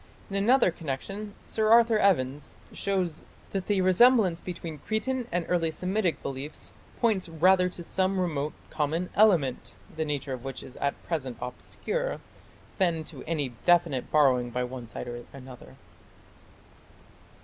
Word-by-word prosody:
In - - -3
another 225 +1 +4
connection 195 +7 -5
Sir 220 -1 0
Arthur 230 -1 +6
Evans 145 -8 +1 0.2
shows 185 -5 -1 0.3
that 195 -2 -3
the 200 -2 +2
resemblance 185 -1 +5
between 170 -4 -6
Cretan 240 - -2
and 175 -1 0
early 170 -2 +1
Semitic 180 -1 -1
beliefs 140 +2 -5 0.3
"points 205 -7 +1
rather 180 +3 +4
to 175 -1 -7
some 190 +2 0
remote 155 -5 -1 0.2
common 160 +4 -1
element, 175 -12 +3 0.2
the 160 - -1
nature 145 -3 -3
of 125 -2 -6
which 135 -1 -6
is 130 - -12
at 140 - -1
present 135 -8 -3
obscure, - - -4 0.6
than 170 -4 +2
to - - -10
any 150 -4 -1
definite 170 -7 +3
borrowing 130 -5 +4
by 125 +1 -2
one 125 -1 -6
side 125 - -7
or 120 0 -6
another". 130 -2 -11
170 Hz, 140 wpm, -28 LUFS, 140-195 Hz, 0.6 s, Arthur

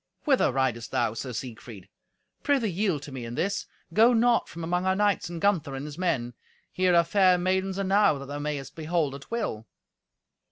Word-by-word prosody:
"Whither 270 - +3
ridest 125 -3 -1
thou, 115 -2 0
Sir 125 +3 -5
Siegfried? 110 -4 -8 0.5
Prithee 265 -8 +1
yield 180 -5 -1
to 145 - -9
me 130 -2 -6
in 115 +1 -6
this. 200 +6 -1 0.3
Go 230 +3 +6
not 235 +1 +3
from 170 - -8
among 180 +2 -1
our 190 - +3
knights, 205 -4 +1
and 170 -1 -6
Gunther, 160 -8 +1
and 135 +2 -5
his 150 +2 -8
men. 135 -10 -1 0.4
Here 185 -1 +2
are 170 - +6
fair 185 +1 +4
maidens 190 +1 0
enow 195 -4 +3
that 140 - -8
thou 145 +1 -6
mayest 145 -2 -4
behold 160 -3 -1
at 140 0 -10
will." 210 - -3
170 Hz, 190 wpm, -27 LUFS, 135-195 Hz, 0.5 s, Go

